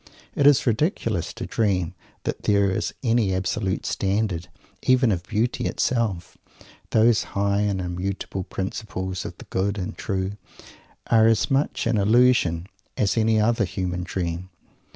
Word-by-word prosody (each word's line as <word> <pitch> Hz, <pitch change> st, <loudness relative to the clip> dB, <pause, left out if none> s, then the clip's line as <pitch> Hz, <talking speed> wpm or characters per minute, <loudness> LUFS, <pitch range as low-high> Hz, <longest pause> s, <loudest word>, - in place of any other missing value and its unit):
It 140 Hz, -, +3 dB
is 145 Hz, -2 st, +5 dB
ridiculous 115 Hz, -, 0 dB
to -, -, -6 dB
dream 95 Hz, -6 st, 0 dB, 0.3 s
that -, -, -3 dB
there 100 Hz, -2 st, +3 dB
is 95 Hz, -, -1 dB
any 115 Hz, -6 st, +2 dB
absolute 95 Hz, +1 st, -1 dB
standard 95 Hz, -3 st, -1 dB, 0.3 s
even 130 Hz, -2 st, +4 dB
of 90 Hz, -3 st, 0 dB
beauty 110 Hz, +6 st, -1 dB
itself. 110 Hz, -8 st, -1 dB, 0.5 s
Those 110 Hz, 0 st, +4 dB, 0.2 s
high 100 Hz, 0 st, +2 dB
and 100 Hz, -2 st, 0 dB
immutable 90 Hz, +1 st, -3 dB
Principles 95 Hz, -1 st, -4 dB
of -, -, -7 dB
The -, -, -12 dB
Good 100 Hz, +2 st, 0 dB
and 90 Hz, -2 st, -4 dB
True 95 Hz, 0 st, -3 dB, 0.7 s
are 110 Hz, -1 st, +5 dB
as 115 Hz, +5 st, +2 dB
much 135 Hz, +2 st, +1 dB
an 115 Hz, -1 st, +2 dB
illusion 105 Hz, -6 st, +3 dB, 0.3 s
as 100 Hz, -, +1 dB
any 110 Hz, -1 st, +3 dB
other 115 Hz, +1 st, +2 dB
human 90 Hz, -1 st, -2 dB
dream. 90 Hz, 0 st, -3 dB
100 Hz, 140 wpm, -24 LUFS, 95-115 Hz, 0.7 s, is